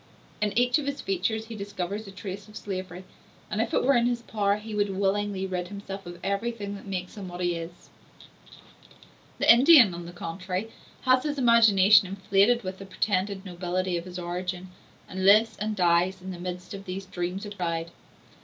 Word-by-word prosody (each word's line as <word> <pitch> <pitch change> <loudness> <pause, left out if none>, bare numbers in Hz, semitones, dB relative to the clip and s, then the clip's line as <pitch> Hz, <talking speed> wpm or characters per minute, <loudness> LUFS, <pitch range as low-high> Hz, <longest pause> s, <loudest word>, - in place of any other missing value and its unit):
In 210 -1 +1
each 245 +4 +3
of 285 - -5
his 280 0 -3
features 195 +4 -1
he 225 0 -8
discovers 200 0 -5
a - - -9
trace 195 +1 -7
of 215 - -11
slavery, 185 -2 -6 0.5
and, 215 - 0
if 225 - -2
it - - +1
were 275 - +4
in 240 0 +3
his 240 -1 -2
power, 205 -3 0
he 215 +1 -8
would 205 -2 0
willingly 200 0 0
rid 180 -2 -3
himself 195 -1 -8
of 175 0 -8
everything 200 +1 -2
that 200 0 -10
makes 185 -2 -4
him 195 -2 -6
what 175 0 -8
he 175 -1 +1
is. 170 +1 -8 1.5
The - - +7
Indian, 255 - +7
on 170 0 -7
the - - -8
contrary, 180 +4 -5 0.3
has 255 -1 +4
his 295 0 -3
imagination 220 -4 +6
inflated 200 +5 +2
with 185 0 -6
the 195 - -8
pretended 195 0 -1
nobility 180 0 -2
of 170 0 -3
his 180 -1 -8
origin, 180 +1 -4 0.4
and 190 0 -5
lives 215 +4 +5
and 215 0 -2
dies 180 +1 +2
in 185 +1 -7
the 175 - -8
midst 180 +1 -6
of 195 0 -8
these 190 +1 -5
dreams 185 +1 -4
of 205 0 -8
pride. 170 -2 -3
195 Hz, 190 wpm, -27 LUFS, 180-215 Hz, 1.5 s, The